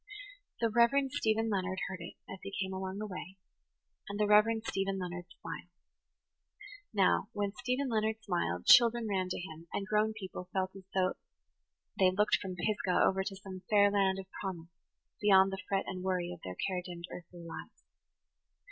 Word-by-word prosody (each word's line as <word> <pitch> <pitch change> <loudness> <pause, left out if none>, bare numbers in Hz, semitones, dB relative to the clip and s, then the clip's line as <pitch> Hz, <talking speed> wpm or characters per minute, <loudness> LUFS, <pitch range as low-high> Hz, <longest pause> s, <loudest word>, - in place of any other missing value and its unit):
The 230 -1 +2
Reverend 260 +4 +4
Stephen 225 -1 +1
Leonard 190 -1 -1
heard 185 -1 -6
it, 170 - -8
as 190 - -8
he 195 - -7
came 190 -1 -2
along 190 0 -4
the 215 - -3
way, 190 -1 -7 0.7
and 205 +1 -4
the 210 - +4
Reverend 215 +2 +5
Stephen 195 -2 -1
Leonard 175 -1 -5
smiled. - - -7 1.2
Now, 200 0 +3
when 205 -1 -1
Stephen 250 +3 0
Leonard 220 -2 +1
[Page 220 - -35
88] - - -18
smiled, 90 - -1
children 235 -1 +7
ran 190 -3 0
to - - -2
him, 165 -2 -9
and 195 - -2
grown 215 +1 +2
people 185 -4 -7
felt 190 0 -1
as 195 -1 -11
if 185 -1 +1 0.8
they 190 -1 +6
looked 210 +3 +3
from 190 -2 -5
Pisgah 185 0 0
over 190 0 +2
to 195 0 -4
some 190 -1 -9
fair 205 -1 +6
land 195 -2 +2
of 195 - -6 0.2
promise 175 -4 -5 0.5
beyond 195 -2 +6
the 195 -1 -4
fret 195 -1 +1
and 185 -1 -5
worry 180 -2 0
of 170 - -12
their 90 - -5
care 185 - -1
dimmed 175 -1 -7
earthly 175 0 -10
lives. 165 -1 -9
195 Hz, 185 wpm, -32 LUFS, 185-210 Hz, 1.2 s, children